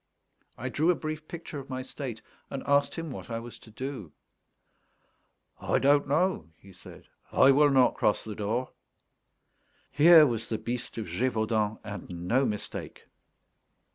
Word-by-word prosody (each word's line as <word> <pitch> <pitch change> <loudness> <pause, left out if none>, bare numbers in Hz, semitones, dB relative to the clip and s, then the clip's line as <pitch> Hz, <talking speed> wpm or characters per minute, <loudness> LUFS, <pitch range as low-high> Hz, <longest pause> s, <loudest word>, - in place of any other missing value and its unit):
I 130 +3 -4
drew 155 +6 +1
a 180 - +4
brief 155 0 -6
picture 165 -3 -7
of 135 - -11
my 130 -1 -4
state, 125 -4 -7 0.3
and 135 - -5
asked 140 0 +2
him 165 -3 -5
what - - -8
I 115 - -3
was 115 -1 -9
to - - -16
do. 110 - -7 1.5
"I - - 0
don't 145 +1 +3
know," 150 - 0
he 95 -1 -17
said; 90 - -14 0.2
"I 135 - +6
will 145 +2 +5
not 130 -2 +4
cross 105 - +1
the 110 - -6
door." 110 +5 -2 1.2
Here 155 +3 +8
was 115 -4 -2
the 110 - -1
Beast 120 +1 -5
of 110 - -3
Gévaudan, 110 +2 0
and 90 -4 -7
no 130 +6 +3
mistake. 105 -1 -6
130 Hz, 155 wpm, -28 LUFS, 110-145 Hz, 1.5 s, Here